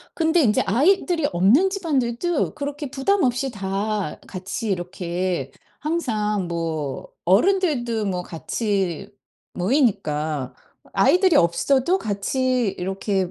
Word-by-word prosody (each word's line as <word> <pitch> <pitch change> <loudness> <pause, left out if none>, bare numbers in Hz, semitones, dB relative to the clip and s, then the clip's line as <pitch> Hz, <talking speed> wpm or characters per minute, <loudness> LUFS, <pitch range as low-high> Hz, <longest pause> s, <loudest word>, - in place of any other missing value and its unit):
근데 325 +1 +3
인제 210 -4 +3
아이들이 325 - +2
없는 215 - +4
집안들도 315 -4 -1
그렇게 290 -1 -5
부담없이 270 -3 +1
다 200 -3 -3
같이 195 +4 -5
이렇게 175 -4 -2 0.3
항상 215 - -1
뭐 160 -5 -3 0.2
어른들도 240 - +2
뭐 180 -2 -2
같이 195 +1 -2 0.5
모이니까 160 - 0 0.4
아이들이 365 -2 +4
없어도 265 - +3
같이 250 - 0
이렇게 190 0 -1
215 Hz, 240 characters per minute, -23 LUFS, 185-285 Hz, 0.5 s, 없는